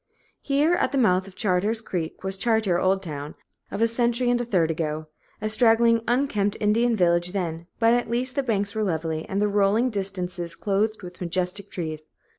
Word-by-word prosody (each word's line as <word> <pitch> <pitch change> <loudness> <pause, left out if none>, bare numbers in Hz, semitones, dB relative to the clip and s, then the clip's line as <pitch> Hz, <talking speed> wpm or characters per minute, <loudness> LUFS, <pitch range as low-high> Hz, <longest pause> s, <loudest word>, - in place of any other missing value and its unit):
Here 290 +4 +2
at - - +1
the 280 - -1
mouth 190 -6 +3
of 190 - -13
Chartier's 205 +3 +1
Creek 180 -7 -5
was 190 0 0
"Chartier's 205 -4 +1
Old 190 +1 +2
Town" 150 -3 -6 0.3
of 225 - -1
a - - +5
century 240 +1 +1
and 240 0 +1
a - - -3
third 175 -8 +1
ago; 155 -1 -3 0.3
a 215 - -2
straggling, 230 +1 +4
unkempt 230 -5 +1
Indian 230 +3 +2
village 175 -2 +2
then, 170 -3 -3
but 230 0 +4
at 245 -1 0
least 250 +2 0
the 280 - 0
banks 205 -5 -1
were 220 - -2
lovely, 160 -4 -2
and 195 - -1
the 210 - +2
rolling 205 +4 +2
distances 180 -4 -4
clothed 205 +3 -1
with 180 0 -10
majestic 185 +3 -2
trees. 155 -3 -5
200 Hz, 190 wpm, -25 LUFS, 180-230 Hz, 0.3 s, a